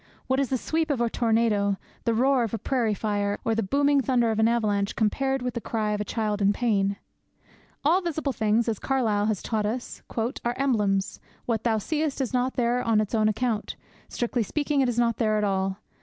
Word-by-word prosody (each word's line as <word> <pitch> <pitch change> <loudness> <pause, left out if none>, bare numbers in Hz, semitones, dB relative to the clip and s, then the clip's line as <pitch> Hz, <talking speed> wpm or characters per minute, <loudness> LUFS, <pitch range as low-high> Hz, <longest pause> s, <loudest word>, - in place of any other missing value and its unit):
What 260 +1 +1
is 275 -3 0
the 260 - +1
sweep 315 +5 -1
of 280 -4 0
a 235 -1 +1
tornado, 220 -4 +1 0.3
the 230 - +2
roar 260 +2 +3
of 225 -1 -2
a - - -2
prairie 230 -4 0
fire, 205 -1 -1
or 225 - +2
the 225 - +1
booming 280 +6 +2
thunder 245 -3 +2
of 220 - -1
an 220 - +4
avalanche, 210 -4 0
compared 265 +4 0
with 250 -1 -2
the 235 - -4
cry 215 -2 -1
of 210 0 -1
a - - 0
child 210 -1 -2
in 200 +1 +4
pain?' 200 -4 +1 0.9
All 345 +6 +4
visible 315 -5 -2
things,' 220 +1 +1
as 220 -3 -1
Carlyle 220 -6 +1
has 215 -4 -1
taught 215 -2 -1
us, 240 +3 -5 0.2
'are 240 +1 -1
emblems. 210 -8 0 0.3
What 225 -2 -1
thou 225 -2 +2
seest 300 +6 -2
is 265 -2 -2
not 255 +1 0
there 245 0 +1
on 225 -3 +2
its 215 0 -2
own 215 -1 +3
account; 220 -1 -1 0.3
strictly 240 0 -1
speaking 290 +5 0
is 245 -3 0
not 235 -2 +2
there 215 -2 +1
at 210 - 0
all. 190 -1 0
230 Hz, 210 wpm, -26 LUFS, 210-255 Hz, 0.9 s, an